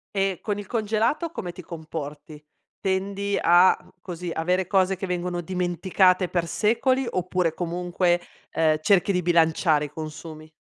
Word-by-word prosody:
E 195 -2 0
con 205 -2 -2
il 205 -1 -7
congelato 225 +9 0
come 180 - -5
ti 180 - -10
comporti? 155 -2 -8 0.4
Tendi 200 +1 -1
a, 175 +2 +6 0.3
così, 175 -1 -6
avere 180 +3 0
cose 190 -1 +2
che 190 +1 -5
vengono 180 0 -2
dimenticate 185 +1 +1
per 170 -2 -1
secoli 255 +7 +1
oppure 180 -4 -1
comunque, 175 +1 0 0.3
ehm, 155 -1 +2
cerchi 200 +2 +3
di 180 -1 +1
bilanciare 160 -2 +3
i - - -8
consumi? 155 +1 -8
180 Hz, 140 wpm, -24 LUFS, 165-195 Hz, 0.4 s, a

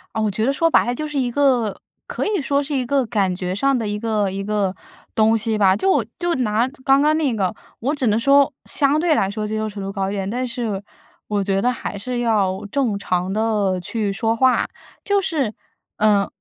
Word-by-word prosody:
啊， 220 - 0
我 215 -1 +1
觉 220 +3 -1
得 270 - +3
说 330 +4 +2
白 - - +4
了 245 0 -1
就 305 +3 -3
是 295 -2 -2
一 245 -2 0
个 245 -6 +1 0.3
可 - - -3
以 410 -7 0
说 280 +1 +1
是 290 0 -3
一 255 -2 0
个 270 0 +1
感 200 -5 0
觉 180 0 -3
上 270 +6 +2
的 225 -3 -2
一 210 0 -2
个 215 -3 0
一 195 +1 -4
个 200 -2 -1 0.4
东 220 +1 +3
西 220 0 0
吧。 190 -2 +4
就 290 - +2
就 350 -1 0
拿 235 -1 +1 0.2
刚 270 +1 +4
刚 305 +1 +3
那 285 -6 +1
个， 190 -4 0 0.3
我 275 +6 -1
只 270 -5 0
能 215 +2 +2
说， 280 +3 +4
相 285 +2 +1
对 335 -1 +3
来 195 -8 +1
说 210 +1 -3
接 215 +1 -3
受 215 0 -2
程 200 -1 -7
度 195 - -4
高 195 -1 -1
一 - - -3
点， 195 -1 -3
但 250 +3 -2
是 225 -5 -3 0.4
我 205 -2 0
觉 195 0 0
得 250 - +2
还 225 - -5
是 245 +4 -3
要 205 -4 +1
正 245 -8 0
常 185 -1 -1
地 210 -3 0
去 205 +3 -2
说 225 +3 0
话。 260 +1 +3 0.4
就 405 -1 +2
是， 300 - -1 0.4
呃， 205 -2 +3
225 Hz, 245 characters per minute, -21 LUFS, 200-270 Hz, 0.4 s, 白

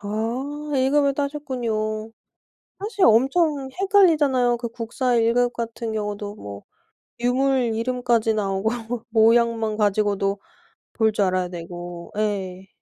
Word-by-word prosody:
아 250 +9 -4
1 260 +1 +2
급을 280 -1 +3
따셨군요. 235 -7 -3 0.7
사실 405 -1 +1
엄청 270 +4 +3
헷갈리잖아요. 300 - +4
그 235 0 -4
국사 240 +2 -2
1 230 0 +3
급 245 0 +2
같은 230 -1 -4
경우도 205 -1 -4
뭐 100 - -9 0.6
유물 250 -1 +1
이름까지 235 -1 +1
나오고 195 0 0 0.4
모양만 225 -1 +3
가지고도 205 -1 +1 0.5
볼 220 -1 +2
줄 205 - +1
알아야 185 -1 0
되고 175 0 -8
예. 195 -3 -2
230 Hz, 240 characters per minute, -23 LUFS, 210-260 Hz, 0.7 s, 헷갈리잖아요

